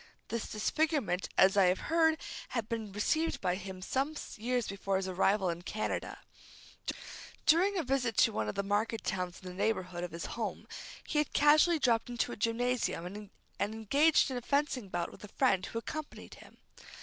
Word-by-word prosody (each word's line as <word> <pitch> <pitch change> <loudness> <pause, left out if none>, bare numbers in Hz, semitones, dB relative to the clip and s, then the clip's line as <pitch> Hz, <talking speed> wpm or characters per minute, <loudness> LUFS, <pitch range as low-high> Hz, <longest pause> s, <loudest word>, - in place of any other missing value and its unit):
This 230 -1 -3
disfigurement, 220 - 0
as 190 +1 +6
I 195 -2 +6
have 180 +1 +2
heard, 320 -1 +3 0.3
had 230 -4 -3
been 225 -3 -4
received 310 +11 0
by 180 - 0
him 185 0 -6
some 275 +8 -1 0.2
years 245 +2 -1
before 195 0 -1
his 190 0 -2
arrival 190 +1 +2
in 170 +1 -6
Canada. 215 +4 -3 1.3
During 365 +6 +4
a 340 - +1
visit 255 -5 0
to - - +5
one 110 -1 -1
of - - -4
the 200 - 0
market 210 +3 0
towns 180 -3 -3
in - - -8
the 180 - -6
neighborhood 185 -3 -1
of 175 - -3
his 165 0 -6
home, 230 -2 -4 0.4
he 300 - +1
had 300 - -1
casually 310 +3 +5
dropped 240 -5 +2
into 240 0 -1
a - - -4
gymnasium, 230 -4 0
and 205 +2 -7 0.3
engaged 245 +9 +3
in 255 - -2
a - - -3
fencing 275 -5 0
bout 175 -1 -2
with - - -14
a - - -7
friend 185 -1 +3
who - - -5
accompanied 305 +6 -6
him. - - -15
220 Hz, 185 wpm, -32 LUFS, 190-275 Hz, 1.3 s, as